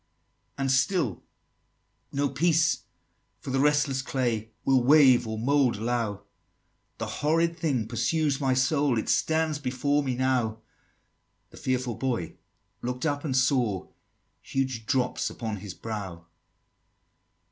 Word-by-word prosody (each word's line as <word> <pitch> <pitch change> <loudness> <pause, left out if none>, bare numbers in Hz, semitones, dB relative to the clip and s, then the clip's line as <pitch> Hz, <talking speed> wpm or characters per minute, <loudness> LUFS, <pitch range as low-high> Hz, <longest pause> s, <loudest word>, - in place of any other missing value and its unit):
XXXV. - - -46
"And 135 -1 0
still 135 - +1 0.9
no 140 0 0
peace 165 +1 +2 0.5
for - - -6
the 135 - +1
restless 145 -2 +2
clay 120 -5 -1 0.2
Will 130 -2 +4
wave 130 -4 +6
or 110 0 -3
mould 135 +1 +2
allow; 110 -2 -2 0.7
The - - -3
horrid 165 +3 +1
thing 140 -9 -1
pursues 135 +5 0
my 130 -2 +2
soul, 135 0 +2
It 110 - -2
stands 160 -2 +1
before 140 +2 0
me 130 -3 -2
now!" 125 -4 0 0.9
The - - -14
fearful 125 -2 -1
Boy 115 -11 -3 0.4
look'd 125 +2 -3
up, 145 -2 -1
and 135 -5 0
saw 125 -8 +1 0.5
Huge 130 -5 -3
drops 125 -1 0
upon 110 -3 -5
his 95 -1 -8
brow. 95 -7 -6
130 Hz, 125 wpm, -27 LUFS, 115-145 Hz, 0.9 s, wave